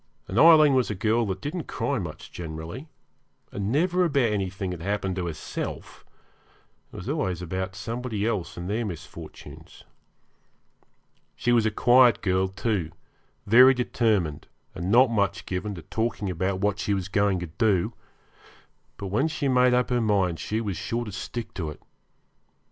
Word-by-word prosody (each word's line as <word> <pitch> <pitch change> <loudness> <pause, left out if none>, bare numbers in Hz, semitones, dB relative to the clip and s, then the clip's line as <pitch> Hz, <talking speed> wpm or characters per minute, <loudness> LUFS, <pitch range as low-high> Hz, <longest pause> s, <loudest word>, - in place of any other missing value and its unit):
And 100 - -1
Aileen 155 -3 +8
was 130 -2 +2
a 105 - -2
girl 110 +3 +1
that 95 -1 -4
didn't 155 +2 -4
cry 140 -3 -1
much 85 -5 -7
generally, 85 - -7 0.6
and 100 +1 -3
never 180 +6 +2
about 140 -9 +2
anything 95 -1 -3
that 90 -2 -6
happened 95 0 -2
to 90 -1 -2
herself; 80 -3 -6 0.9
it - - -14
was 90 - -7
always 95 - -1
about 95 +2 -4
somebody 115 +1 -3
else 105 -7 -2
and 85 +1 -5
their 110 +4 -1
misfortunes. 90 -8 -9 1.5
She 120 - 0
was 115 -2 +4
a - - +3
quiet 120 +2 +5
girl, 95 -1 +2
too, 95 -3 -2 0.6
very 125 +5 +7
determined, 110 - 0 0.3
and 85 +3 -4
not 120 +3 +5
much 100 -3 0
given 95 +2 -3
to 85 - -9
talking 110 -4 -2
about 95 +2 -2
what 105 -1 0
she 105 -1 0
was 95 -1 -3
going 100 0 +1
to 90 - -4
do; 95 +2 +1 1.0
but 100 - -5
when 115 +11 +1
she 150 -3 -2
made 125 -1 +4
up 125 0 +1
her 120 -1 +2
mind 95 -6 +1
she 110 +1 -2
was 100 -6 -3
sure 120 +1 -3
to 105 - -7
stick 110 +4 -6
to 80 -5 -4
it. 75 - -9
105 Hz, 165 wpm, -26 LUFS, 95-120 Hz, 1.5 s, Aileen